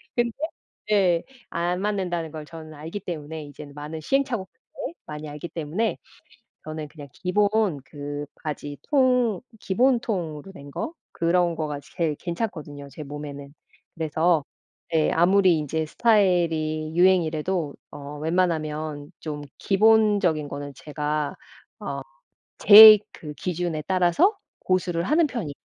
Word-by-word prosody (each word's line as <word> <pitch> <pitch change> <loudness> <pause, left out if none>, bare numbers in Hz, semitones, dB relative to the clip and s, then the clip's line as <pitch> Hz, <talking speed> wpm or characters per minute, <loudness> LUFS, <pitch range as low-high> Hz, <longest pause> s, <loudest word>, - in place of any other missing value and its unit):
근데 240 -1 +1 0.6
네, 185 -5 +3 0.3
안 175 +2 -1
맞는다는 180 -6 -2
걸 155 -1 -7
저는 155 0 -10
알기 160 +7 -6
때문에 160 -3 -6
이제는 145 0 -11
많은 150 +2 -6
시행착오 250 - 0 0.3
때문에, - - -5
많이 150 0 -7
알기 150 +3 -7
때문에 170 +8 -2 0.7
저는 155 -1 -6
그냥 145 -1 -12
기본 205 -2 +1
그 145 +1 -6
바지 145 -2 -6
통 250 -7 +3 0.2
기본 245 +7 +2
통으로 175 -6 -4
된 140 -5 -11
거 315 - -4 0.2
그런 170 0 +1
거가 150 -3 -3
제일 160 -3 -2
괜찮거든요, 155 -6 -5
제 145 +3 -8
몸에는. 145 -1 -8 0.4
그래서 160 0 +1 0.5
예 160 -1 +3
아무리 185 +1 +4
인제 155 +2 -2
스타일이 165 -7 +2
유행이래도 175 -3 +2 0.2
어 145 +1 -8
웬만하면 155 -3 -1
좀 150 -2 -5 0.2
기본적인 205 -6 +3
거는 145 0 -6
제가 150 0 -2
어 - - -12 1.2
제 215 +1 +11
그 150 -2 -8
기준에 170 0 -3
따라서 190 - +3 0.2
고수를 175 -2 0
하는 310 - +3
편이에요. 220 - -4
165 Hz, 275 characters per minute, -25 LUFS, 150-190 Hz, 1.2 s, 제